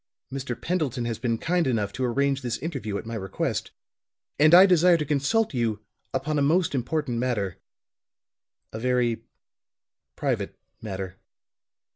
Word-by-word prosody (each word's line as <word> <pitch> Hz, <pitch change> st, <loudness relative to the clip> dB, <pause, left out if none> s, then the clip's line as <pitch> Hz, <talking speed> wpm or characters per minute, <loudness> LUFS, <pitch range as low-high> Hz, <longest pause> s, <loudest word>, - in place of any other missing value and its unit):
Mr. 130 Hz, -3 st, -4 dB
Pendleton 145 Hz, -9 st, -1 dB
has 115 Hz, -2 st, -3 dB
been 115 Hz, -2 st, 0 dB
kind 170 Hz, +4 st, +1 dB
enough 105 Hz, -5 st, 0 dB
to 130 Hz, -, -3 dB
arrange 135 Hz, +2 st, +1 dB
this 120 Hz, -2 st, -2 dB
interview 130 Hz, -10 st, -4 dB
at -, -, -7 dB
my 115 Hz, -, -6 dB
request; 95 Hz, -4 st, -2 dB, 0.7 s
and 155 Hz, +1 st, +6 dB
I 180 Hz, +3 st, +10 dB
desire 180 Hz, -2 st, +5 dB
to 150 Hz, -, -2 dB
consult 150 Hz, +9 st, +1 dB
you 115 Hz, -4 st, 0 dB, 0.3 s
upon 150 Hz, -1 st, -1 dB
a -, -, +1 dB
most 165 Hz, +5 st, +2 dB
important 130 Hz, -1 st, -1 dB
matter 110 Hz, -7 st, -1 dB, 1.1 s
a 110 Hz, -, -4 dB
very 125 Hz, -2 st, +1 dB, 0.9 s
private -, -, -2 dB, 0.2 s
matter." 95 Hz, -3 st, -5 dB
130 Hz, 140 wpm, -26 LUFS, 115-155 Hz, 1.1 s, I